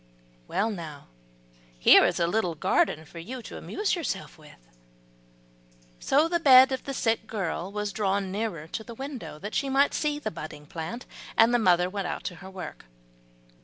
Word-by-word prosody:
Well 220 +3 0
now, 160 -7 -8 0.7
here - - +7
is - - 0
a 170 - +3
little 175 -2 0
garden 155 +1 +1
for 170 - -11
you 245 +8 -7
to - - -8
amuse 415 -1 -2
yourself 295 - -4
with." 155 -2 -16 1.4
So 295 +4 +3
the 345 0 0
bed 265 -3 +8
of 260 - -3
the 275 - -4
sick 225 -2 0
girl 190 -3 -3
was 210 -1 -3
drawn 195 -2 0
nearer 200 -6 -3
to 220 - -5
the 235 +1 -10
window, 270 - -7
that 205 +7 -7
she 275 - 0
might 275 +2 +3
see 295 -1 0
the 295 - -4
budding 155 -2 -8
plant; 170 - -6 0.3
and 225 +2 +6
the 240 - +4
mother 180 -4 +4
went 195 0 -3
out - - -4
to 180 - -4
her 190 +3 -10
work. 190 - -8
205 Hz, 180 wpm, -27 LUFS, 170-255 Hz, 1.4 s, bed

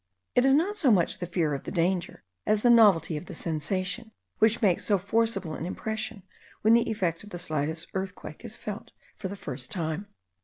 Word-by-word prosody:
It 250 - +4
is 270 0 +6
not 365 +8 +2
so 315 -10 +3
much 185 -7 +3
the 175 - -3
fear 170 -4 0
of 140 - -4
the - - -5
danger, 175 +1 0 0.2
as 215 0 +2
the 240 - +6
novelty 190 -9 +5
of 165 - -8
the 180 - -7
sensation, 185 +8 -2 0.3
which 220 +1 +4
makes 190 -6 +2
so 205 - +3
forcible 195 -3 0
an 160 - -4
impression 220 +1 -3 0.4
when 220 +2 +6
the 235 0 +4
effect 180 -6 -1
of 210 - -11
the 175 - -6
slightest 160 -1 -3
earthquake 190 -3 -5
is 235 0 -7
felt 210 -2 -7 0.2
for 195 - -4
the 200 - -6
first 130 -9 -6
time. 165 +3 -2
190 Hz, 200 wpm, -28 LUFS, 165-220 Hz, 0.4 s, is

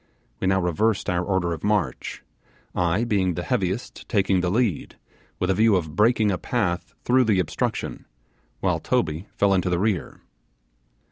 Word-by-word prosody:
We - - -1
now 95 0 +3
reversed 95 +4 +1
our 90 0 0
order 90 -3 0
of 80 - -7
march, 100 - -1 0.5
I, 90 +5 +1
being 95 -6 +1
the 85 - -3
heaviest, 100 -2 -2
taking 95 -3 +2
the 90 - 0
lead, 110 - 0 0.4
with 90 +1 0
a - - +3
view 110 +2 +4
of 80 -4 -2
breaking 110 0 +3
a 90 - -2
path 90 -8 -2
through 125 +1 +4
the 105 -3 +3
obstruction, 80 -4 -2 0.6
while - - +1
Toby 80 +6 -1
fell 100 -1 +3
into 90 -1 +1
the 90 - +1
rear. 100 -1 -1
95 Hz, 160 wpm, -24 LUFS, 90-105 Hz, 0.6 s, view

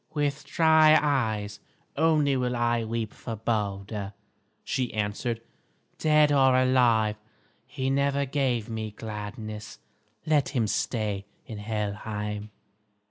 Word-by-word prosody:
"With 145 -1 -1
dry 160 -1 +5
eyes 110 -8 -1 0.4
only 150 -2 +3
will 125 -1 0
I 120 -1 +1
weep 110 -1 -3
for 115 - -6
Balder," 105 -2 -3 0.5
she 125 -2 -2
answered. 110 +3 -2 0.6
"Dead 150 -1 +4
or 135 -2 +5
alive, 120 -5 +3 0.5
he 130 0 -2
never 140 +1 +1
gave 130 -5 0
me 110 -1 -4
gladness. 105 - -7 0.5
Let 150 -3 +2
him 115 -3 +2
stay 105 -2 -1 0.2
in 110 -2 -7
Helheim." 105 0 -4
115 Hz, 110 wpm, -27 LUFS, 105-135 Hz, 0.6 s, dry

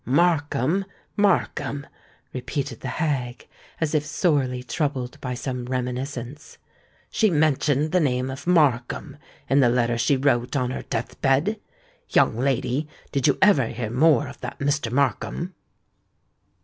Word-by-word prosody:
"Markham—Markham!" 170 - 0 0.5
repeated 130 -1 -4
the - - -6
hag, 130 -7 -2 0.3
as 160 -2 -1
if 150 -2 +2
sorely 145 -5 0
troubled 130 -2 -3
by 125 -1 -3
some 125 -1 -4
reminiscence; 125 +2 -4 0.5
"she 220 - +3
mentioned 150 -2 +2
the 180 - +3
name 130 -4 0
of 135 +5 -8
Markham 145 -3 +2 0.3
in 135 - +3
the 125 -3 +5
letter 120 -1 +1
she 140 +4 +3
wrote 130 -1 +1
on 125 -2 0
her - - -4
death 115 - -5
bed? 145 +11 +2 0.5
Young - - +3
lady, 135 +3 0 0.2
did 140 0 +1
you 140 - +3
ever 155 - +5
hear 115 -2 -4
more 145 +1 +4
of - - -11
that - - -6
Mr. 140 -4 0
Markham?" 140 +7 -1
135 Hz, 135 wpm, -24 LUFS, 125-150 Hz, 0.5 s, the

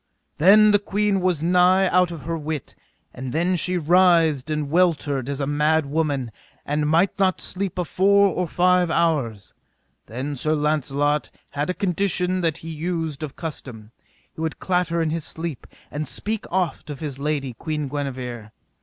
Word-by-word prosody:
Then 210 +6 +7
the 205 - +4
queen 205 0 0
was 180 -4 0
nigh 180 +2 +4
out 180 0 +3
of 165 -4 -7
her 165 +1 -3
wit, 155 -3 -5 0.4
and 130 0 -6
then 175 +5 +1
she 180 +1 +1
writhed 165 -4 +3
and 150 -2 -2
weltered 155 -6 +1
as 140 0 -3
a 140 - 0
mad 150 +2 +2
woman, 140 -5 -1 0.3
and 150 +1 0
might 170 +6 +2
not 190 -2 +2
sleep 190 -1 -3
a 180 - -1
four 200 +4 +4
or 180 0 -2
five 180 0 +2
hours. 145 - 0 0.5
Then 130 +5 -4
Sir 155 +4 0
Launcelot 145 -3 0 0.2
had 145 +3 -2
a 180 - -1
condition 185 -1 0
that 165 -2 0
he - - -5
used 160 -2 -3
of 150 -3 -6
custom, 125 -9 -7 0.4
he - - -8
would 160 -1 -2
clatter 180 -2 0
in 155 - -1
his 165 -1 -2
sleep, 160 -4 -5 0.2
and 150 0 -4
speak 215 +8 -4
oft 180 -4 -1
of 145 - -6
his 145 -4 -5
lady, 140 -3 -2
Queen 150 +3 -4
Guenever. 130 -5 -5
160 Hz, 170 wpm, -23 LUFS, 145-180 Hz, 0.5 s, Then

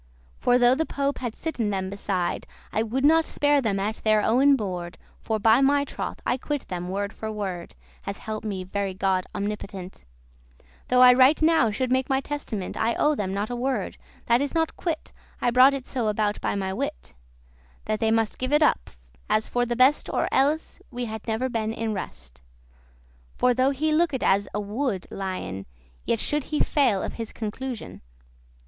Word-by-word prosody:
For, 245 0 +3
though 245 0 +5
the 305 +5 +1
Pope 280 0 -1
had 240 -3 -4
sitten 245 -10 -2
them 190 -1 -2
beside, 195 -3 -2 0.3
I 220 - +1
would 245 +5 -1
not 320 +2 +5
spare 290 -1 +2
them 205 -5 0
at 210 +3 -2
their 215 -1 +3
owen 275 +5 +5
board, 180 -7 -4 0.2
For, 220 - -1
by 220 +4 +4
my 285 +1 +3
troth, - - -5
I 250 - +1
quit* 290 +2 -4
them 180 0 -4
word 200 +2 -3
for 220 0 -5
word 190 -5 -5
*repaid 60 +1 -28
As - - -4
help 215 -1 -5
me 195 -4 -3
very 195 0 -3
God 190 -1 +1
omnipotent, 200 - -5 0.8
Though 250 0 +4
I 250 0 +9
right 260 +4 +5
now 315 -7 +4
should 250 +4 -2
make 260 0 +1
my 265 0 +2
testament 270 -9 -4
I 230 +1 +1
owe 300 - +3
them 200 -9 -2
not 205 +4 -2
a - - -2
word, 245 -4 -2 0.3
that 235 +2 +3
is 285 +3 -2
not 325 -1 +1
quit* 325 -3 -4 0.3
*repaid - - -1
I - - +4
brought 260 +3 +6
it 265 -2 -6
so 245 -4 -2
aboute 210 0 -1
by - - -1
my 190 -1 -2
wit, 60 - -5 0.7
That 215 0 -1
they 225 - +2
must 225 -1 +1
give 255 +1 -2
it 295 +1 +5
up, - - +2 0.4
as 215 - +2
for 245 0 0
the 240 - -1
best 260 +4 +4
Or - - 0
elles 290 +4 +1
had - - -23
we 245 -1 -4 0.2
never 225 +3 0
been 225 -3 -2
in 225 -1 -2
rest. 60 - -7 1.0
For, 250 - +3
though 255 +2 +3
he 300 +3 0
looked 305 -5 +1
as 195 +1 +3
a 210 - -2
wood* 210 -1 -2
lion, 185 - -5
*furious 60 0 -31
Yet 230 - +1
should 295 +4 0
he 305 - -2
fail 245 -10 +2
of - - -4
his 230 -2 -6
conclusion. 235 +3 -6
225 Hz, 200 wpm, -25 LUFS, 200-265 Hz, 1.0 s, I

